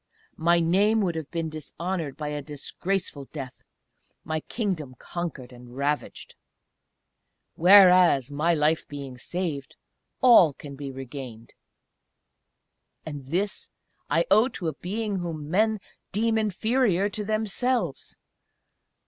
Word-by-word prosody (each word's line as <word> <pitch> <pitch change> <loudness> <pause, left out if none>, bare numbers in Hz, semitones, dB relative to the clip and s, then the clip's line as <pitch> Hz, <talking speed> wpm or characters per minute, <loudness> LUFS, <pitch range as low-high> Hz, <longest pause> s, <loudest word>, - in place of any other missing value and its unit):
My 170 +1 +3
name 200 +6 +3
would 180 -4 0
have 160 -3 -5
been 165 -2 -3
dishonoured 160 0 -4
by 150 -1 -4
a 150 0 -3
disgraceful 150 +2 -4
death, 135 -3 -8 0.6
my 155 0 -2
Kingdom 160 - -3
conquered 160 -8 -6
and 120 +1 -13
ravaged 145 +1 -2 1.2
whereas, 180 -7 +6
my 160 +4 +1
life 155 +1 +1
being 140 -3 -8
saved, 165 -3 -4 0.4
all 230 - +7
can 140 +1 -10
be 140 0 -6
regained. 130 -3 -9 1.5
And 145 -3 -7
this 185 +9 -2 0.4
I - - +2
owe 220 +4 +6
to 180 -10 -3
a - - -5
being 205 +6 -3
whom 160 -4 -5
men 215 +3 +2 0.3
deem 225 +2 +1
inferior 220 -1 +1
to 210 +1 -4
themselves! 215 - -1
165 Hz, 115 wpm, -26 LUFS, 145-200 Hz, 1.5 s, all